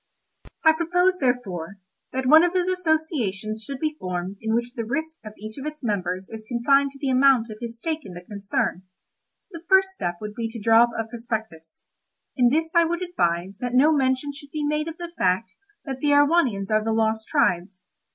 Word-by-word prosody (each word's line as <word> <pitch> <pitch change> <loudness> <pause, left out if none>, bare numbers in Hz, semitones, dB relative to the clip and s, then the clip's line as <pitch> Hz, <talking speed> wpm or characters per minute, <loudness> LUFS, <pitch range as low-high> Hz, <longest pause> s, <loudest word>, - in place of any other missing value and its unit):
I 320 - +9
propose, 355 +3 +1
therefore, 200 - -2 0.3
that 260 0 -2
one 310 +5 +7
of 350 0 +1
those 365 -1 +1
associations 310 - -1
should 275 +3 -6
be 310 +1 -1
formed 185 +2 -4
in 220 0 0
which 240 +1 -2
the 235 -3 -3
risk 315 +7 -3
of 215 -1 -9
each 215 +4 -8
of - - -7
the 305 0 -5
members 190 -4 -2
is 220 -1 -8
confined 275 +4 +3
to - - -13
the 270 -2 -1
amount 255 -3 +4
of 215 - -9
his 235 -1 -5
stake 315 +5 -2
in 190 - -10
the 175 - -8
concern. 195 -1 -2 0.7
The 335 -3 -8
first 385 0 +5
step 180 - -3
would 210 0 -6
be 230 0 -3
to 230 +1 -8
draw 225 +2 +5
up 240 - -9
a 225 - 0
prospectus. 220 -8 -6 0.5
In 245 -3 +4
this 320 +4 0
I 340 - +6
would 340 +2 -1
advise 185 - -1
that 245 0 -3
no 295 +5 +5
mention 265 0 0
should 285 0 -13
be 300 0 -3
made 300 +1 0
of 325 0 -6
the 345 -1 -7
fact 185 +5 +1 0.3
that 265 -3 -5
the 295 - -1
Erewhonians 285 - +3
are 215 0 +3
the 225 0 0
lost 220 0 0
tribes. 180 +1 0
245 Hz, 205 wpm, -24 LUFS, 210-305 Hz, 0.7 s, I